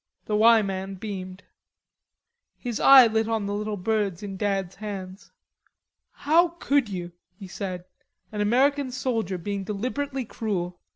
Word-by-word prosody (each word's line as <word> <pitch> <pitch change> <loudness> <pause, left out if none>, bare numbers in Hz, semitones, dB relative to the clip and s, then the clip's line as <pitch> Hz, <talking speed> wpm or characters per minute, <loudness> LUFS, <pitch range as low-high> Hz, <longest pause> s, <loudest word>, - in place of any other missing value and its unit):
The 210 - -1
"Y" 225 +1 +6
man 195 0 -4
beamed. 190 -1 -7 1.1
His 240 -4 -4
eye 270 -2 +9
lit 220 -1 +1
on 225 -2 -1
the 200 - -3
little 210 0 -3
birds 200 -2 -1
in 195 -1 -5
Dad's 195 -2 -2
hands. 195 -3 -7 0.8
"How 330 +4 +3
could 280 -8 +1
you?" 175 -3 -5 0.3
he 195 - -9
said. 180 -1 -5 0.5
"An 210 -1 -3
American 265 +6 +2
soldier 230 -7 -2
being 200 +2 -4
deliberately 255 +6 -3
cruel. 180 -6 -4
210 Hz, 135 wpm, -25 LUFS, 190-235 Hz, 1.1 s, eye